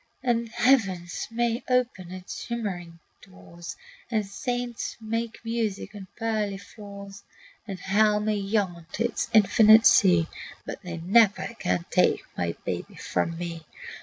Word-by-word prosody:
And 235 Hz, -2 st, +1 dB
heaven 220 Hz, -9 st, +2 dB, 0.2 s
may 235 Hz, +1 st, 0 dB
open 245 Hz, -8 st, 0 dB
its 185 Hz, 0 st, -7 dB
shimmering 190 Hz, -8 st, -4 dB, 0.2 s
doors, 95 Hz, -, -11 dB, 0.3 s
And 215 Hz, -3 st, 0 dB
saints 245 Hz, +3 st, -4 dB
make 230 Hz, +1 st, -3 dB
music 225 Hz, -3 st, -2 dB
on 200 Hz, -2 st, -9 dB
pearly 215 Hz, -3 st, -1 dB
floors, 200 Hz, -1 st, -11 dB, 0.5 s
And 195 Hz, -3 st, -5 dB
hell 210 Hz, +2 st, +3 dB
may 210 Hz, 0 st, 0 dB
yawn 195 Hz, -5 st, -1 dB
to 230 Hz, -, 0 dB
its 240 Hz, 0 st, -2 dB
infinite 220 Hz, +1 st, +7 dB
sea, 180 Hz, -5 st, +6 dB, 0.4 s
But -, -, -6 dB
they 175 Hz, -4 st, -6 dB
never 200 Hz, +5 st, +3 dB
can 90 Hz, -2 st, 0 dB
take -, -, +3 dB
my 85 Hz, -1 st, -2 dB
baby -, -, -4 dB
from 165 Hz, 0 st, -2 dB
me. 170 Hz, -1 st, -5 dB
205 Hz, 135 wpm, -26 LUFS, 180-230 Hz, 0.5 s, infinite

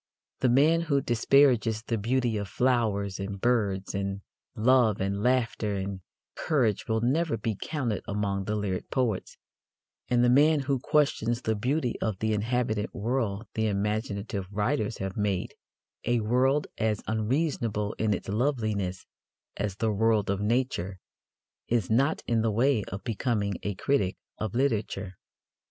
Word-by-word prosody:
The 130 Hz, -, +3 dB
man 150 Hz, +7 st, +4 dB
who 150 Hz, -4 st, +1 dB
disparages 120 Hz, -2 st, +3 dB
the 115 Hz, -2 st, -2 dB
beauty 120 Hz, +1 st, +1 dB
of 100 Hz, -1 st, -2 dB
flowers 105 Hz, -6 st, 0 dB
and 100 Hz, 0 st, -4 dB
birds 100 Hz, -5 st, 0 dB
and 100 Hz, 0 st, -3 dB, 0.3 s
love 115 Hz, -2 st, +4 dB
and 100 Hz, +1 st, -1 dB
laughter 115 Hz, -4 st, +1 dB
and 95 Hz, 0 st, -4 dB, 0.3 s
courage 120 Hz, -, 0 dB
will 110 Hz, 0 st, +1 dB
never 140 Hz, +2 st, +1 dB
be 110 Hz, 0 st, -2 dB
counted 120 Hz, -, -2 dB
among 100 Hz, -1 st, -1 dB
the 105 Hz, -, -1 dB
lyric 100 Hz, -3 st, -3 dB
poets; 120 Hz, -7 st, -1 dB, 0.7 s
and 120 Hz, -1 st, +3 dB
the -, -, +5 dB
man 150 Hz, +3 st, +5 dB
who 135 Hz, -1 st, 0 dB
questions 125 Hz, -4 st, +1 dB
the 110 Hz, -, +1 dB
beauty 125 Hz, +4 st, -1 dB
of 110 Hz, -4 st, -1 dB
the 110 Hz, +2 st, 0 dB
inhabited 110 Hz, -1 st, 0 dB
world 110 Hz, -1 st, -1 dB
the 110 Hz, 0 st, 0 dB
imaginative 100 Hz, -1 st, -2 dB
writers 105 Hz, +2 st, -1 dB
have 95 Hz, 0 st, -4 dB
made 100 Hz, -3 st, -1 dB, 0.5 s
a 120 Hz, 0 st, +1 dB
world 130 Hz, +6 st, +2 dB
as 110 Hz, -2 st, 0 dB
unreasonable 110 Hz, -2 st, -1 dB
in 110 Hz, -1 st, +1 dB
its 100 Hz, -, -2 dB
loveliness 105 Hz, -5 st, -1 dB, 0.5 s
as 100 Hz, -3 st, -2 dB
the 110 Hz, +1 st, 0 dB
world 105 Hz, -1 st, +2 dB
of 100 Hz, 0 st, -2 dB
nature 105 Hz, -5 st, 0 dB, 0.7 s
is 115 Hz, -4 st, 0 dB
not 135 Hz, +7 st, +2 dB
in 115 Hz, -1 st, +1 dB
the 115 Hz, -, +1 dB
way 115 Hz, +1 st, +2 dB
of 95 Hz, +1 st, -7 dB
becoming 110 Hz, -3 st, -1 dB
a 100 Hz, -1 st, -3 dB
critic 100 Hz, -3 st, 0 dB, 0.2 s
of 110 Hz, +1 st, -3 dB
literature. 105 Hz, -7 st, -1 dB
110 Hz, 145 wpm, -28 LUFS, 100-125 Hz, 0.7 s, the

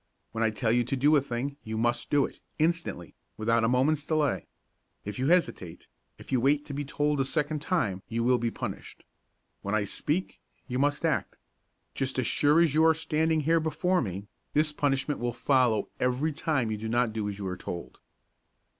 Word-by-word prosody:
When 115 Hz, 0 st, -1 dB
I 110 Hz, -, +3 dB
tell 110 Hz, +1 st, 0 dB
you 120 Hz, +1 st, +3 dB
to 130 Hz, -, -1 dB
do 145 Hz, +4 st, +4 dB
a 145 Hz, -, +5 dB
thing, 135 Hz, +2 st, -4 dB
you 110 Hz, 0 st, -4 dB
must 120 Hz, +2 st, 0 dB
do 145 Hz, -1 st, +3 dB
it, -, -, -10 dB, 0.2 s
instantly; 160 Hz, -, -1 dB, 0.2 s
without 115 Hz, +1 st, +2 dB
a -, -, +3 dB
moment's 140 Hz, +5 st, +2 dB
delay. 155 Hz, -3 st, 0 dB, 0.6 s
If 105 Hz, +2 st, -5 dB
you 130 Hz, -, +1 dB
hesitate, 160 Hz, -, 0 dB, 0.3 s
if -, -, -13 dB
you 130 Hz, -3 st, +2 dB
wait 145 Hz, +3 st, +2 dB
to 145 Hz, -, -7 dB
be 145 Hz, +1 st, -2 dB
told 145 Hz, +1 st, 0 dB
a -, -, +3 dB
second 150 Hz, +2 st, -1 dB
time, 105 Hz, -, 0 dB
you 115 Hz, 0 st, -1 dB
will 125 Hz, 0 st, +3 dB
be 120 Hz, -, 0 dB
punished. -, -, -7 dB, 0.6 s
When 100 Hz, +2 st, -1 dB
I 105 Hz, -, +2 dB
speak, 150 Hz, -, -2 dB, 0.3 s
you 125 Hz, -1 st, -2 dB
must 145 Hz, +3 st, +1 dB
act. 160 Hz, -4 st, 0 dB, 0.6 s
Just 130 Hz, -1 st, -2 dB
as 130 Hz, -, +1 dB
sure 150 Hz, +6 st, +3 dB
as 165 Hz, -5 st, +3 dB
you 155 Hz, +1 st, +4 dB
are 160 Hz, 0 st, +5 dB
standing 160 Hz, 0 st, +1 dB
here 165 Hz, +3 st, +3 dB
before 180 Hz, +3 st, +1 dB
me, 100 Hz, -2 st, -4 dB, 0.3 s
this 150 Hz, +1 st, +3 dB
punishment 145 Hz, 0 st, 0 dB
will 120 Hz, 0 st, -1 dB
follow 125 Hz, -6 st, +2 dB
every 125 Hz, +5 st, 0 dB
time 140 Hz, -7 st, 0 dB
you 110 Hz, -, -2 dB
do 110 Hz, +1 st, -5 dB
not 120 Hz, -1 st, +1 dB
do 105 Hz, -2 st, -2 dB
as 100 Hz, -, -6 dB
you 100 Hz, -, -5 dB
are 90 Hz, -1 st, -3 dB
told." 85 Hz, -8 st, -7 dB
135 Hz, 200 wpm, -28 LUFS, 115-150 Hz, 0.6 s, a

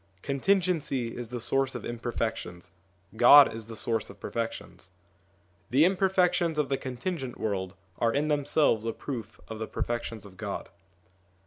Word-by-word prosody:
Contingency 145 Hz, -5 st, 0 dB
is 120 Hz, -2 st, -6 dB
the 125 Hz, 0 st, -4 dB
source 135 Hz, +3 st, 0 dB
of -, -, -5 dB
imperfections: 115 Hz, -6 st, -4 dB, 0.4 s
God 130 Hz, +4 st, +8 dB
is 110 Hz, -1 st, -7 dB
the 115 Hz, -, -8 dB
source 110 Hz, -1 st, -1 dB
of -, -, -13 dB
perfections. 115 Hz, -5 st, -5 dB, 0.8 s
The 140 Hz, +6 st, +5 dB
imperfections 180 Hz, -3 st, +2 dB
of 150 Hz, -3 st, +1 dB
the 135 Hz, -, +1 dB
contingent 130 Hz, +1 st, -5 dB
world 95 Hz, -3 st, -2 dB, 0.2 s
are 115 Hz, -1 st, +3 dB
in 145 Hz, +5 st, 0 dB
themselves 145 Hz, -5 st, +2 dB
a 115 Hz, 0 st, -2 dB
proof 115 Hz, -6 st, -7 dB
of 110 Hz, -1 st, -7 dB
the 110 Hz, -, -3 dB
perfections 115 Hz, -3 st, -4 dB
of 95 Hz, -2 st, -14 dB
God. -, -, -5 dB
120 Hz, 145 wpm, -28 LUFS, 115-145 Hz, 0.8 s, God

